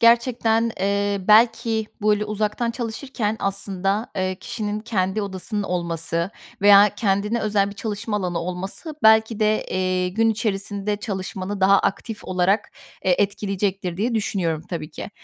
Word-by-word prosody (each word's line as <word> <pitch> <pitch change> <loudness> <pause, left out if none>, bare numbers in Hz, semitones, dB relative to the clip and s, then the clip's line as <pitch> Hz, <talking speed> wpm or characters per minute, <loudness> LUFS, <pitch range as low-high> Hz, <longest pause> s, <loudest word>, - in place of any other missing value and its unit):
gerçekten, 230 -1 +3
eee, 200 0 0
belki, 225 0 +4 0.2
böyle 210 0 +2
uzaktan 215 +2 -1
çalışırken 230 -2 -3
aslında, 195 +2 -1
eee, 185 0 0
kişinin 215 -3 -4
kendi 210 -2 -1
odasının 200 +1 -3
olması 170 -1 -1 0.3
veya 205 0 +8
kendine 210 +2 0
özel 205 -2 +1
bir - - -10
çalışma 210 +1 -3
alanı 180 -4 -2
olması 185 - -4
belki 220 0 +5
de, 215 0 +2
eee, 185 0 0
gün 225 +4 +2
içerisinde 205 -1 -1
çalışmanı 195 -1 -5
daha 195 +1 +6
aktif 220 +2 -3
olarak, 185 +3 +1 0.3
eee, 180 -1 +4
etkileyecektir 195 -3 -1
diye 230 +4 -1
düşünüyorum, 175 -7 -1
tabii 165 -3 -4
ki. - - -8
205 Hz, 135 wpm, -22 LUFS, 190-220 Hz, 0.3 s, veya